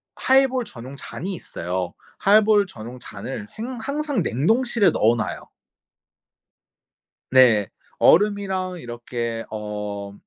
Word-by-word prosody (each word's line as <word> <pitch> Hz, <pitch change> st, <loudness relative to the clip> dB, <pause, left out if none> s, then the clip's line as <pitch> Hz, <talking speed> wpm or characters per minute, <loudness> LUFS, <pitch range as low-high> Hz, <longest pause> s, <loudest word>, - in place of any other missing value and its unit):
하이볼 260 Hz, -2 st, +3 dB
전용 130 Hz, -, -10 dB
잔이 185 Hz, +6 st, -6 dB
있어요. 90 Hz, -, -4 dB, 0.3 s
하이볼 210 Hz, 0 st, +5 dB
전용 120 Hz, -5 st, -9 dB
잔을 105 Hz, -1 st, -7 dB
행 245 Hz, +3 st, -5 dB
항상 285 Hz, -3 st, -1 dB
냉동실에 225 Hz, -, +2 dB
넣어놔요. 115 Hz, +1 st, +1 dB, 1.9 s
네. 120 Hz, -6 st, +6 dB, 0.3 s
얼음이랑 190 Hz, -1 st, +3 dB
이렇게 120 Hz, -2 st, -5 dB
어 105 Hz, -2 st, -5 dB
135 Hz, 215 characters per minute, -23 LUFS, -, 1.9 s, 네